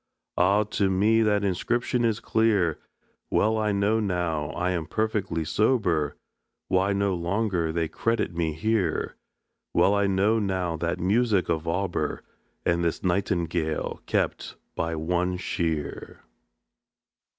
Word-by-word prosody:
Ah! 100 +4 +3
to 100 -2 0
me 105 +4 +3
that 105 -2 +2
inscription 120 +6 0
is 115 -2 +1
clear; 105 -8 +1 0.5
Well 110 +1 +2
I 105 -1 +1
know 100 +2 +2
now, 90 -7 -1
I'm 85 -1 -1
perfectly 100 -6 -1
sober, 90 - +1 0.5
Why 95 +2 +2
no 100 0 +1
longer 90 -1 -1
they 85 0 -1
credit 115 -1 -1
me 85 -2 -1
here, 110 +5 -1 0.6
Well 100 - +4
I 100 -1 +2
know 100 +4 +2
now 95 -4 -1
that 85 +2 -2
music 105 +1 +2
of 80 0 -1
Auber, 90 +2 -1 0.4
And 85 0 +2
this 85 - -1
Nightingale, 85 -4 -1
kept - - -1 0.2
by 85 0 -1
one 90 +3 0
Shear." 80 -4 -3
95 Hz, 125 wpm, -26 LUFS, 85-105 Hz, 0.6 s, Well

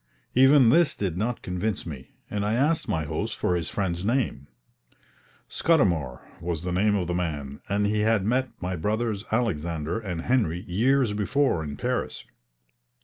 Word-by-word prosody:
Even 135 -1 +6
this 165 +2 +4
did 95 -5 -2
not 115 +6 -2
convince 90 +3 -2
me, 70 -6 -8 0.2
and 105 -1 -2
I 105 +2 +1
asked 150 +6 +1
my 80 - 0
host 75 - -3
for 90 - +1
his 85 -4 -2
friend's 90 -3 -2
name. 110 - -1 1.0
Scudamour 85 - +1 0.2
was 85 -2 -3
the 90 - -2
name 105 +4 +2
of 95 -3 0
the 90 - -2
man, 75 -6 -3
and 100 +1 +1
he 105 +1 +1
had 105 -2 +2
met 130 +3 +1
my 90 0 -3
brothers 105 +4 -1
Alexander 85 -6 -1
and 90 -7 -4
Henry 90 -7 0
years 120 +5 +2
before 105 - +1
in 70 -2 -6
Paris. - - -2
100 Hz, 160 wpm, -26 LUFS, 85-115 Hz, 1.0 s, Even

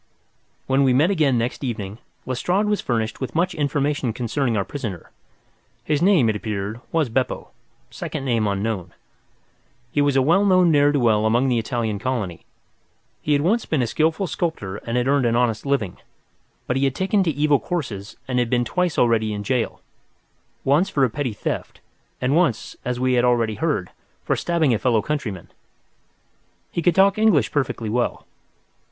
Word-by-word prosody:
When 135 +1 +2
we 130 -2 +4
met 155 +8 +4
again 150 -9 +2
next 120 +4 -2
evening, 110 -4 -4 0.3
Lestrade 180 +11 0
was 210 -1 0
furnished 115 -1 -2
with 130 - -4
much 170 +3 +1
information 145 -4 -1
concerning 120 0 -1
our 100 - 0
prisoner. 110 - -6 0.7
His 150 0 0
name, 175 - +4
it 110 - +1
appeared, 105 +1 -4
was 160 -4 +1
Beppo, 125 +3 -2 0.4
second 135 - -5
name 115 -4 +1
unknown. 100 -3 -2 1.0
He 145 - +1
was 145 -1 +2
a 135 - +4
well 170 +8 +4
known 185 -3 +4
ne'er 145 -1 +4
do 145 - +1
well 110 -3 +3
among 120 +4 +2
the 120 -2 +2
Italian 110 -2 -2
colony. 110 -8 -3 0.7
He 150 - +1
had 145 0 +2
once 215 +7 +1
been 145 -5 +1
a - - +1
skilful 160 - 0
sculptor 160 - -3
and 115 +3 -3
had 125 +1 +1
earned 140 -3 +3
an 115 - +1
honest 120 0 0
living, 125 -10 -1 0.7
but 125 - -1
he 135 - +2
had 135 -1 0
taken 195 +2 +1
to 180 - +1
evil 145 -1 +2
courses 115 - -5
and 125 -1 0
had 120 -2 0
twice 180 +4 -1
already 115 -2 +3
been 105 - -2
in 105 - -4
jail—once 135 - -3
for 140 - +1
a 125 - +2
petty 135 -4 -2
theft, - - -4 0.4
and 130 +3 +1
once, 160 -10 +1
as 125 0 -2
we 130 0 +1
had 120 -1 +3
already 120 -3 +2
heard, - - -1 0.3
for - - +1
stabbing 165 -6 +1
a 110 - 0
fellow 115 -4 +2
countryman. 110 - -4 1.2
He 170 - -2
could 170 0 +2
talk 195 +2 +4
English 170 - +3
perfectly 130 -5 -1
well. 120 +1 -1
130 Hz, 175 wpm, -22 LUFS, 115-150 Hz, 1.2 s, we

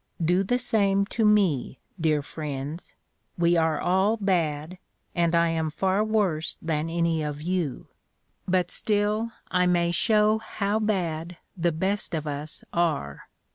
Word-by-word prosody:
Do 180 +3 +3
the 220 +6 +1
same 200 -5 +2
to 230 - +1
me, 195 - +2 0.2
dear 155 -3 +1
friends. 150 +1 -6 0.4
We 170 0 +3
are 160 -2 +2
all 190 +5 +2
bad, 175 -4 -1 0.3
and 170 -1 +2
I 170 0 +4
am 160 -1 -1
far 190 +6 +1
worse 200 -8 0
than 160 0 -2
any 170 -1 0
of 150 0 -4
you; 175 -5 -2 0.6
but 185 -1 +1
still 210 +2 0 0.2
I 180 0 +3
may 175 -1 +2
show 215 +3 +3
how 210 -1 -2
bad 175 -5 -2 0.2
the 170 -2 +1
best 190 +3 -1
of 155 -1 -3
us 150 +1 -5
are. 155 - -1
175 Hz, 140 wpm, -26 LUFS, 160-200 Hz, 0.6 s, I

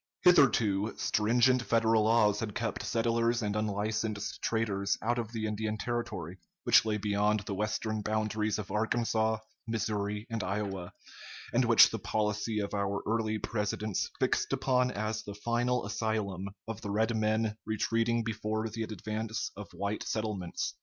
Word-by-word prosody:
Hitherto, 115 - +4
stringent 120 +4 +3
Federal 115 -2 +3
laws 110 -2 +4
had 105 -3 -4
kept 115 -2 -2
settlers 115 0 +1
and 105 0 -1
unlicensed 105 0 -2
traders 100 -4 0
out 120 +2 0
of 115 -1 -4
the 110 -2 -3
Indian 110 0 -2
territory, 110 -7 -4 0.2
which - - +6
lay 110 -1 0
beyond 105 0 +1
the 100 0 -5
western 110 +1 -1
boundaries 110 0 0
of 100 -3 -6
Arkansas, 110 +1 +1 0.3
Missouri, 105 -2 -2
and 115 -1 -1
Iowa, 95 -2 -3 0.6
and - - +3
which - - +7
the - - -3
policy 105 +1 -1
of 100 - -4
our 100 -1 -1
early 110 -1 0
Presidents 105 -1 -2
fixed - - +1
upon 130 -1 +2
as 110 -1 -2
the 100 -1 -8
final 120 +3 0
asylum 105 -3 -2 0.2
of 115 -2 -5
the 100 - -5
red 110 +3 +1
men 110 0 +1
retreating 115 +2 +1
before 110 0 -2
the 110 +1 -5
advance 110 +1 -3
of 105 0 -7
white 100 +2 -3
settlements. 105 -6 -2
110 Hz, 145 wpm, -31 LUFS, 105-115 Hz, 0.6 s, which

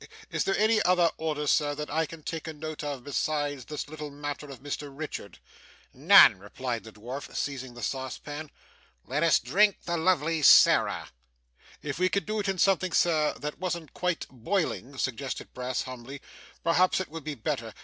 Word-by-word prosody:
Is - - 0
there 195 - +1
any 215 +1 +3
other 180 -2 +4
order, 150 -2 -2
sir, 145 0 +2
that 150 +1 -5
I 160 +1 +1
can 165 -1 -11
take 165 +1 -5
a 160 - -4
note 155 0 -6
of, 140 -4 -4
besides 145 -1 -2
this 150 -1 -5
little 150 0 -7
matter 145 0 -6
of 135 -2 -11
Mr 145 0 -4
Richard?' 135 - -7 0.6
'None,' - - +7
replied 115 +4 -4
the 110 - -11
dwarf, 125 +7 -8
seizing 130 -3 -4
the 120 - -8
saucepan. 145 +3 -4 0.6
'Let 145 +4 -1
us 165 -1 +5
drink 205 +1 +3
the 170 0 -1
lovely 165 -2 +1
Sarah.' - - +6 0.7
'If 145 +1 -4
we 185 0 +3
could 200 - -1
do 215 0 -2
it 200 -1 -1
in 195 - -1
something, 185 -1 +2
sir, 155 -3 +3
that 150 +1 -6
wasn't 170 -4 -4
quite 180 -2 -1
boiling,' 140 - -2
suggested 130 +1 -3
Brass 125 0 -2
humbly, 130 +2 -8 0.4
'perhaps 180 +3 +3
it 190 - -4
would 160 0 -8
be 150 0 -4
better. 115 - -3
150 Hz, 180 wpm, -28 LUFS, 135-170 Hz, 0.7 s, None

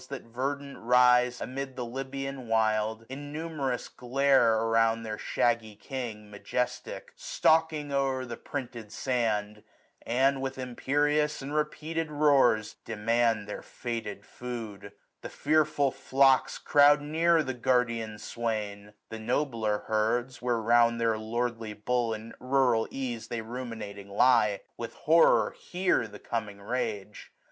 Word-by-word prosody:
That 140 -2 -6
verdant 140 +4 -4
rise 125 +1 +4
amid 135 0 -5
the 125 - -4
Lybian 135 +1 -5
wild, 110 0 +1
Innumerous 145 -1 -4
glare 130 -2 +3
around 115 0 +2
their 110 -1 -5
shaggy 115 -3 0
king 115 -3 -6
gi^ - - -17
Majestic, 125 - -4
stalking 160 - +1
o'er 135 -2 0
the 120 -2 -6
printed 120 -5 -6
sand 110 -5 -1
5 105 - -20 0.4
And, 135 +3 +2
with 135 0 -3
imperious 145 +4 0
and 140 +2 -5
repeated 155 +1 -2
roars. 140 -7 +3
Demand 115 -1 +1
their 105 - -6
fated 110 -4 -6
food. 115 -5 -7 0.3
The - - -7
fearful 150 -2 +2
flocks 135 0 +3
Croud 145 0 +5
near 160 +2 +2
the 130 - -3
guardian 115 -3 0
swain; 105 -2 -4 0.2
the 115 - -6
nobler 115 -3 -1
herds. 120 +4 0
Where 120 -1 +1
round 115 +1 +3
their 115 -1 +1
lordly 115 0 -3
bull, 115 +3 -1
in 110 +1 -9
rural 125 -3 +2
ease, 125 -4 -5
930 - - -3
They - - -2
ruminating 110 -5 -7
lie, 105 -2 +3 0.2
with 115 -1 -6
horror 165 +2 +4
hear 180 -9 0
The 105 -1 -11
coming 105 -2 -4
rage. 105 -2 -4
120 Hz, 130 wpm, -29 LUFS, 110-135 Hz, 0.4 s, Croud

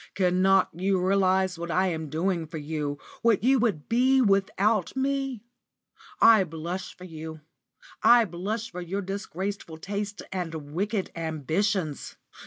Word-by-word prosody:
Cannot 185 0 +3
you 190 +3 0
realise 190 -1 +2
what 170 0 -5
I 185 +2 +2
am 160 -3 -4
doing 165 +2 -1
for 160 - -7
you, 150 -1 -3 0.2
what 225 -4 +3
you 265 +2 +4
would 205 -11 0
be 255 +3 +3
without 200 -1 +2
me? 270 -3 -1 0.8
I 220 -4 +7
blush 175 +2 -6
for 180 - -12
you; 160 -2 -8 0.6
I 240 -1 +7
blush 205 +6 -4
for 180 -1 -6
your 195 +3 -3
disgraceful 195 -2 -5
tastes 200 +4 -4
and 165 -5 -5
wicked 200 +3 -1
ambitions. 160 - -2
190 Hz, 135 wpm, -27 LUFS, 165-205 Hz, 0.8 s, I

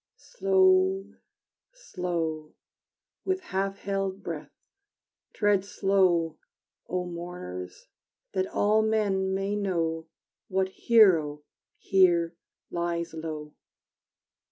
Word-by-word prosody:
Slow, 380 -3 +2 0.6
slow 170 - -4 0.7
With 375 0 0
half 195 - -2
held 195 -1 -3
breath 165 -3 -5 0.8
Tread 205 -2 +2
slow, 185 -5 +1 0.5
O 180 0 -1
mourners, 170 - -7 0.5
that 190 -1 0
all 210 +2 +2
men 205 -3 +1
may 195 +1 -1
know 165 -5 -1 0.4
What 190 -1 0
hero 175 -10 +4 0.3
here 175 -3 +3 0.4
lies 170 -1 -2
low! 155 -2 -6
190 Hz, 85 wpm, -27 LUFS, 165-205 Hz, 0.8 s, hero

